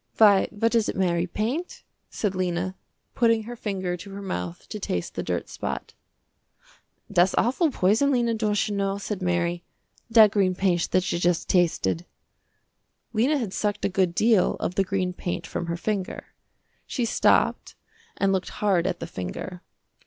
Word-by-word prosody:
"Why, 205 -3 +6
what 230 +3 0
is 230 -2 +2
it, - - -3
Mary, 175 -2 +1
paint?" 240 - -3 0.3
said 205 -3 -2
Lena, 185 0 -1 0.4
putting 230 -2 +3
her 240 +2 -7
finger 190 -5 -3
to 200 +3 -10
her 200 +1 -7
mouth 90 - -5
to 210 - -5
taste 90 - -3
the - - -3
dirt - - -3
spot. 70 -1 -5 1.1
"That's 180 +2 +3
awful 270 +8 +2
poison 220 +4 +2
Lena, 240 -4 +2
don't 215 -2 0
you 210 - -3
know?" 195 0 -1
said 200 -1 -4
Mary, 175 -1 0 0.5
"that 220 -3 +7
green 190 -3 +2
paint 180 -3 +1
that 185 0 +1
you 170 - -1
just 175 -1 +1
tasted." 170 - +1 1.1
Lena 255 +7 +2
had 225 -8 -3
sucked 210 -1 -1
a - - +2
good 185 -2 +1
deal 220 -4 +3
of - - -3
the 195 - +2
green 185 -2 -1
paint 175 -1 -4
from 170 - -4
her 170 0 -2
finger. 200 0 -4 0.5
She 245 - -1
stopped 230 - +2 0.4
and 195 -1 +2
looked 185 -1 -1
hard 190 -4 +1
at 180 -2 -3
the - - -2
finger. 170 - -6
195 Hz, 165 wpm, -25 LUFS, 175-215 Hz, 1.1 s, that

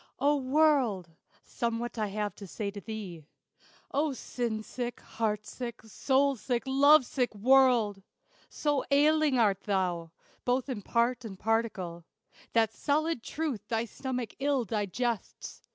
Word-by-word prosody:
] - - -49
O 295 - +4
World! 260 - +2 0.3
somewhat 235 0 -3
I 215 - 0
have 205 +1 -3
to 200 - -9
say 200 +2 -4
to 205 0 -8
thee. 195 -8 -7 0.7
O 295 0 +1
sin 235 -4 -3
sick, 245 +1 -5
heart 215 -2 -2
sick, 240 +1 -6
soul 270 +5 +1
sick, 245 0 -2
love 280 +2 +6
sick 245 -2 -1
World! 240 -3 +4 0.5
So 290 -3 0
ailing 295 0 +4
art 200 -4 +3
thou, 180 -4 -1 0.3
both 250 +2 0
in 240 -6 -3
part 235 +4 +1
and 205 -4 -7
particle, 195 -6 -1 0.5
That 225 -1 +3
solid 310 0 0
truth 290 -5 -4
thy 225 0 0
stomach 250 0 -4
ill 275 -3 +1
digests. 220 +2 -3
235 Hz, 135 wpm, -30 LUFS, 210-270 Hz, 0.7 s, love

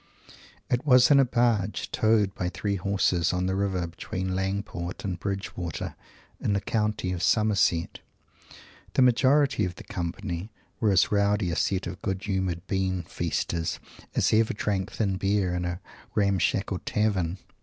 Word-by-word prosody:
It 125 +2 0
was 125 -2 +6
in 140 - +7
a 135 - +6
Barge, 120 -5 0
towed 110 -3 +2
by 90 - -2
three 100 +3 -2
Horses, 90 -3 +1
on 90 0 -1
the 95 - 0
River, 95 -2 0
between 95 +2 -4
Langport 95 -2 -3
and 90 -3 -3
Bridgewater, 95 -7 -4 0.5
in 105 - 0
the 100 - +2
County 105 -3 -1
of 90 -2 -3
Somerset! 100 -6 +2 0.9
The 130 - +4
majority 130 0 +4
of 90 -2 -2
the - - -10
company 85 +2 -4 0.3
were 110 - +2
as 95 - +4
rowdy 100 -2 +2
a - - -1
set 95 -1 0
of 90 +2 -6
good 95 +1 -2
humored 95 -3 -2
Bean 95 -2 -1
Feasters 85 0 -2 0.4
as - - +2
ever 110 -1 +3
drank 100 -2 -1
thin 100 -4 -1
beer 95 -1 +1
in 90 0 -1
a 90 0 -3 0.4
ramshackle 100 -1 +1
tavern. 100 -5 0
95 Hz, 155 wpm, -27 LUFS, 90-105 Hz, 0.9 s, in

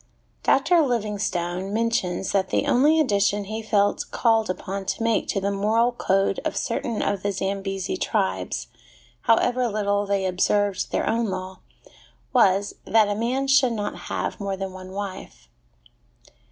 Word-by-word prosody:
Dr 325 +5 +4
Livingstone 200 - -2
mentions 210 -5 -1
that 190 -2 +1
the - - +1
only 295 +6 +4
addition 205 -6 +2
he 215 +3 -5
felt 205 -2 +1
called 225 -3 +2
upon 190 +2 -4
to - - -2
make 230 -1 +1
to 195 - 0
the 200 +1 -1
moral 220 +4 +2
code 195 - +1
of - - -2
certain 230 -3 -2
of 200 -2 -1
the 205 - -1
Zambesi 195 - -3
tribes - - -1 0.6
(however 245 +2 +3
little 205 -2 0
they 200 -1 0
observed 190 +1 +1
their - - 0
own 230 0 +1
law) 185 -1 -5 0.7
was, 200 -5 +3
that 220 -2 +4
a - - +1
man 245 +5 -1
should 270 -3 +4
not 205 -2 -3
have - - -3
more 200 -1 -3
than 190 -1 -5
one 185 0 -10
wife. 190 - -7
205 Hz, 150 wpm, -24 LUFS, 195-230 Hz, 0.7 s, Dr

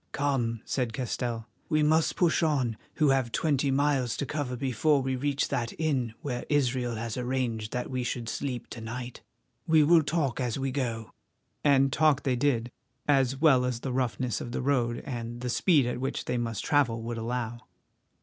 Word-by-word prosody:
"Come," 120 -6 0
said 125 -4 -1
Castell, 120 -1 -3 0.2
"we 155 -1 +3
must 155 +1 +3
push 175 -2 +2
on, 135 -8 +1 0.2
who 150 -2 +3
have 130 -3 +2
twenty 140 0 +1
miles 135 -3 +1
to 140 - -2
cover 140 -4 -3
before 135 +3 +2
we 130 0 -1
reach 140 +2 0
that 115 +3 -3
inn 130 -8 0
where 125 -4 -3
Israel 125 -4 +1
has 115 +1 -4
arranged 125 -4 -2
that 125 +1 -3
we 130 -1 -1
should 120 -1 -3
sleep 125 0 -3
to 115 - -7
night. 120 +2 -6 0.5
We 160 -1 +6
will 165 +2 +6
talk 150 -4 -1
as 125 -2 -1
we 135 -1 -1
go." 115 -5 -3 0.5
And 135 -2 +4
talk 155 -3 +3
they 130 -4 +1
did, 120 -3 0 0.4
as 135 -2 +3
well 135 -4 +5
as 125 -2 -2
the 130 - -3
roughness 125 -1 -1
of 120 - -6
the - - -1
road 120 -4 0
and 120 -3 -5
the 125 -1 -2
speed 150 -2 +3
at 125 0 -3
which 135 - -2
they 125 - -1
must 115 -3 -3
travel 120 -6 +2
would 115 0 -4
allow. 120 0 -3
130 Hz, 185 wpm, -28 LUFS, 120-145 Hz, 0.5 s, We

